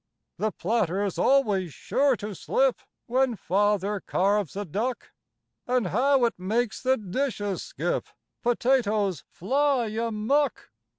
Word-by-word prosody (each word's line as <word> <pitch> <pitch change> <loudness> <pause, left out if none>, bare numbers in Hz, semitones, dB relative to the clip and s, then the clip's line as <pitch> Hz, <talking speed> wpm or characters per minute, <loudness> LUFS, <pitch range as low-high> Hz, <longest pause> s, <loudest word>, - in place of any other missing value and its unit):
The 215 0 0
platter's 200 -1 -1
always 205 - +2
sure 275 -1 +2
to 210 -2 -6
slip - - +1 0.3
When 255 0 +1
Father 205 +1 +1
carves 200 -1 0
a 205 +1 -3
duck. 225 +9 -3 0.6
And 245 -6 +1
how 260 +4 +3
it 230 - -2
makes 220 +5 -1
the 260 0 +2
dishes 205 -1 -2
skip! - - -3 0.3
Potatoes 230 - +1
fly 265 - +1
amuck! 230 +5 -1
220 Hz, 115 wpm, -26 LUFS, 200-260 Hz, 0.6 s, how